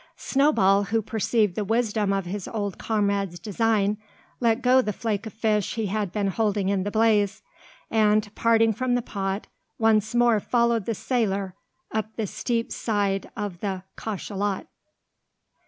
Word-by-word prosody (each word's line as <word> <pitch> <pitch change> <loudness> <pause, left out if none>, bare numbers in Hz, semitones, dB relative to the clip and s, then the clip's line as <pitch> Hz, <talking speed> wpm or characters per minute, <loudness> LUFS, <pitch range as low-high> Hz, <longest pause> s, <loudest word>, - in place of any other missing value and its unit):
Snowball, 205 -9 +3
who 225 +2 +1
perceived 220 -1 0
the 210 - -2
wisdom 215 -1 +1
of 195 -2 0
his 190 +2 -5
old 205 -4 -3
comrade's 200 -4 0
design, 210 +2 0 0.4
let 235 0 +2
go 255 +1 +5
the 210 - -2
flake 215 0 -3
of 220 - -9
fish 215 -3 0
he 225 -2 -1
had 205 -1 -2
been 205 0 -1
holding 205 -1 0
in 200 -1 +1
the 200 - -2
blaze; 215 -2 +2 0.5
and, 215 -1 +2
parting 225 -1 +3
from 245 +3 0
the 245 - 0
pot, 195 -2 -3 0.3
once 220 0 +2
more 240 -2 +4
followed 235 -1 +1
the 230 - 0
sailor 200 -6 -1 0.4
up 220 0 -3
the 220 - -1
steep 230 +3 -2
side 200 -3 -1
of 205 -5 -4
the 190 -2 -3
cachalot. 205 -1 -3
215 Hz, 155 wpm, -25 LUFS, 200-225 Hz, 0.5 s, go